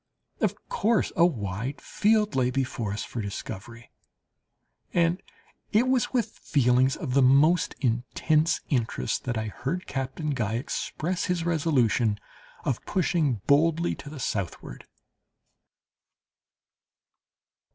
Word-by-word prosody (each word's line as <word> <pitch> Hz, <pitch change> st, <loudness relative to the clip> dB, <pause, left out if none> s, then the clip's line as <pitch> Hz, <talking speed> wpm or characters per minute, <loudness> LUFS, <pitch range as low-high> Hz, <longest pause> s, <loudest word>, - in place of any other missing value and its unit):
Of -, -, +1 dB
course 235 Hz, -, +1 dB
a 170 Hz, -, +6 dB
wide 115 Hz, -, -4 dB
field 215 Hz, -2 st, +1 dB
lay 125 Hz, -1 st, +2 dB
before 125 Hz, -5 st, -2 dB
us 105 Hz, -, -3 dB
for 120 Hz, -, -5 dB
discovery, 110 Hz, +3 st, -7 dB, 1.0 s
and 170 Hz, +1 st, +2 dB, 0.5 s
it 225 Hz, +4 st, +3 dB
was 255 Hz, -3 st, +2 dB
with 235 Hz, -4 st, -1 dB
feelings 130 Hz, -1 st, +3 dB
of 135 Hz, -2 st, +1 dB
most 150 Hz, +6 st, +4 dB
intense 145 Hz, +6 st, +1 dB
interest 120 Hz, -6 st, -1 dB
that 120 Hz, -3 st, -1 dB
I 110 Hz, 0 st, -2 dB
heard 140 Hz, -, -4 dB
Captain 135 Hz, +4 st, -3 dB
Guy 110 Hz, -5 st, -1 dB
express 165 Hz, +7 st, -2 dB
his 175 Hz, -2 st, -1 dB
resolution 130 Hz, -10 st, +2 dB, 0.5 s
of 125 Hz, -, -1 dB
pushing 160 Hz, -, +1 dB
boldly 165 Hz, +4 st, +3 dB
to 145 Hz, -, -9 dB
the 150 Hz, -1 st, -8 dB
southward. 95 Hz, -, -4 dB
135 Hz, 110 wpm, -27 LUFS, 120-170 Hz, 1.0 s, a